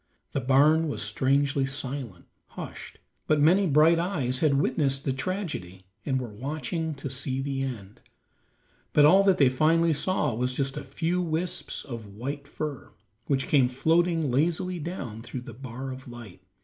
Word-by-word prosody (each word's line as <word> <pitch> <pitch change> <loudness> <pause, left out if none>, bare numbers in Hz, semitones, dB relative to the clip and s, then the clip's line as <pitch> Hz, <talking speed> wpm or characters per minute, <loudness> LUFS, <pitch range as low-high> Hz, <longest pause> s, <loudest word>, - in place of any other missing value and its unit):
The 140 - -1
barn 150 +5 +4
was 145 - -2
strangely 140 0 +1
silent, 135 -8 -4 0.2
hushed, - - -9 0.3
but 155 -1 +3
many 180 +6 +4
bright 160 +3 +5
eyes 145 -9 0
had 150 -3 +3
witnessed 135 -1 +1
the 135 - +1
tragedy 135 - -4 0.2
and 130 -2 +1
were 125 - -4
watching 155 - -3
to 140 - -6
see 130 0 -2
the 135 0 -2
end, 110 -7 -6 0.9
but 150 - +6
all 185 +6 +7
that 195 -2 +4
they 140 - +5
finally 160 +5 +3
saw 170 -3 +1
was 125 +3 -1
just 135 0 -1
a - - -5
few 165 +6 -1
wisps 170 +1 -3
of 115 -6 -8
white 140 +6 -5
fur, 150 -4 -5 0.4
which 135 -2 0
came 135 -4 +4
floating 165 +3 +1
lazily 170 +6 0
down 140 - -6
through 120 +2 -6
the 120 -1 -10
bar 130 +2 -7
of 130 +1 -9
light. 120 -6 -11
140 Hz, 160 wpm, -27 LUFS, 130-160 Hz, 0.9 s, all